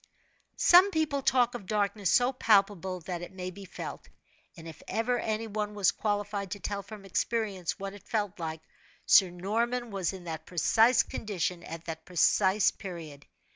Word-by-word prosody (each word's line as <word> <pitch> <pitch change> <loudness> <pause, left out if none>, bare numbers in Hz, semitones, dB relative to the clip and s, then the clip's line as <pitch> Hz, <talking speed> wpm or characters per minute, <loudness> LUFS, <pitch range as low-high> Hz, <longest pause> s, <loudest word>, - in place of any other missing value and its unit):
Some 360 +3 +7
people 310 -6 0
talk 250 -2 +3
of 220 -6 -8
darkness 205 -2 0
so 250 0 +3
palpable 195 -6 +2
that 175 +1 -5
it 175 - -8
may 185 -1 -6
be 195 +1 -11
felt, - - -8 0.5
and 165 0 -10
if 160 -1 -11
ever 240 +2 0
any 220 0 -2
one 210 -1 -4
was 200 -3 +3
qualified 205 -2 -2
to 205 - -5
tell 200 0 -3
from 205 0 -11
experience 195 -2 -2
what 195 0 -6
it 205 - -14
felt 205 -5 -2
like, 160 -1 -4 0.4
Sir 190 -3 +6
Norman 230 +7 -2
was 195 -4 -1
in 190 -2 -9
that 160 -2 -6
precise 225 +8 +4
condition 180 -4 -3
at 165 0 -8
that 160 -1 -6
precise 190 +2 +3
period. 160 -6 -9
200 Hz, 170 wpm, -29 LUFS, 180-220 Hz, 0.5 s, Some